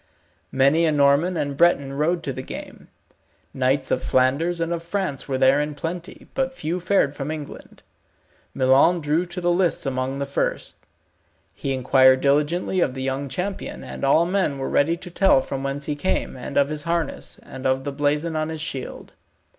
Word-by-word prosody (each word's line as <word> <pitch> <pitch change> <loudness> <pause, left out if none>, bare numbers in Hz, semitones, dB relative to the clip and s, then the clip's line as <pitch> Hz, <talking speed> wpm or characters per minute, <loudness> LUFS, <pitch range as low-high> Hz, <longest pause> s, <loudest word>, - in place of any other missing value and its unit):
Many 140 +5 +3
a - - +2
Norman 145 +5 +3
and 145 -2 -2
Breton 140 -4 +3
rode 160 +4 0
to 135 - -3
the 130 - -5
game; - - -9 0.7
knights 130 +1 +1
of 130 - +1
Flanders 140 +7 +1
and 165 +1 -1
of 170 - -3
France 170 -5 -3
were 135 -2 -1
there 135 +2 +4
in 150 0 -3
plenty, 165 +4 -6
but 265 0 -1
few 170 -3 -3
fared 180 -6 +2
from 145 0 -5
England. 155 -2 -8 0.7
Milon 135 +7 +4
drew 160 +3 0
to 175 +2 -5
the 175 0 +1
lists 175 -3 +1
amongst 130 0 -2
the 140 - -2
first. 140 - -2 0.8
He 135 - -4
inquired 130 0 +4
diligently 150 +6 +1
of 135 -7 +1
the 130 - -4
young 135 +1 -2
champion, 185 +9 -4
and - - -8
all 150 +5 +4
men 180 -6 0
were 135 - -3
ready 165 +4 +2
to 180 0 -10
tell 190 -5 +4
from 135 0 -4
whence 140 +1 -3
he 150 - -2
came, 145 -1 -1
and 130 +2 -6
of 140 0 +3
his 150 -1 -2
harness, 165 -1 -3
and 130 0 -5
of 130 0 +1
the 145 - -3
blazon 150 +3 0
on 155 0 -1
his 160 -1 -5
shield. 135 -4 -6
145 Hz, 185 wpm, -23 LUFS, 135-170 Hz, 0.8 s, there